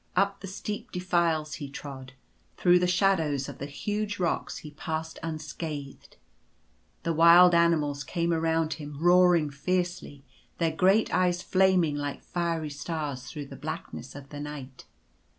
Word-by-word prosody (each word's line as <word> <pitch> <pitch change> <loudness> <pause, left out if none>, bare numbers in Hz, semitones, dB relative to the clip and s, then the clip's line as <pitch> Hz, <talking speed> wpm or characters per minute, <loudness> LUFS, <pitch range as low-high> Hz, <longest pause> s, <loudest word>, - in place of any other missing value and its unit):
Up 200 0 +2
the 195 - -8
steep 205 +2 -5
defiles 170 -4 0
he 140 - -5
trod. 135 -2 -8 0.4
Through 180 0 +5
the 180 - +1
shadows 170 -7 +2
of - - -9
the 140 - -4
huge 210 +8 -3
rocks 175 -2 -1
he 150 - -8
passed 160 +2 -5
unscathed. 155 -3 -6 0.9
The 165 - 0
wild 170 +2 +7
animals 155 -4 +2
came 170 +3 -1
around 160 -1 +1
him 145 -2 -8
roaring 175 -3 +5
fiercely 175 -1 -3 0.2
— - - -36
their 165 -2 +1
great 190 +6 +3
eyes 180 -1 +2
flaming 185 -5 +3
like 145 -1 -4
fiery 165 -3 -2
stars 145 -3 -4
through 145 +2 -6
the - - -10
blackness 135 +2 -7
of 140 -1 -10
the 145 - -8
night. 145 -3 -8
160 Hz, 150 wpm, -28 LUFS, 145-180 Hz, 0.9 s, wild